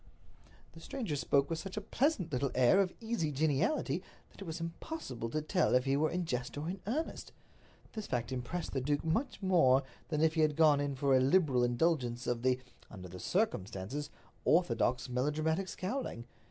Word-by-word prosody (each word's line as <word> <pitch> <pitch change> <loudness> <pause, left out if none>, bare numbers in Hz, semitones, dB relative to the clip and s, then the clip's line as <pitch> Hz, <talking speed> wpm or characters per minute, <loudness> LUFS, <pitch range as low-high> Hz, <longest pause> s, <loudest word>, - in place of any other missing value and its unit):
The 165 - -13
stranger 215 - -4
spoke 140 +1 +2
with 165 -1 -3
such 195 +2 -7
a - - +2
pleasant 210 - 0
little 135 +2 +1
air 130 +9 +5
of 185 -2 0
easy 220 -9 -1
geniality 150 - +1 0.3
that - - -16
it - - -6
was 165 -1 -5
impossible 165 - -5
to 155 +4 -2
tell 175 -3 +2
if 125 +1 +3
he 135 0 +2
were 155 +2 +2
in 180 0 -2
jest 125 -3 -3
or 150 +2 -3
in 185 +3 -4
earnest. 300 +9 -3 0.6
This 215 -2 -5
fact 120 +1 -2
impressed 130 +7 -3
the 135 - 0
duke 145 +3 0
much 220 - -1
more 140 -8 +5 0.3
than 155 -2 0
if 160 0 +4
he 160 - +1
had 155 -1 +3
gone 155 -2 +5
in 145 -1 -1
for 135 0 +3
a - - +6
liberal 135 -2 +3
indulgence 120 -1 +1
of 120 -1 -1
the—under 125 -7 -3
the 90 +1 -9
circumstances—orthodox 140 - -1
melodramatic 155 +8 0
scowling. 185 - -4
150 Hz, 180 wpm, -33 LUFS, 130-180 Hz, 0.6 s, a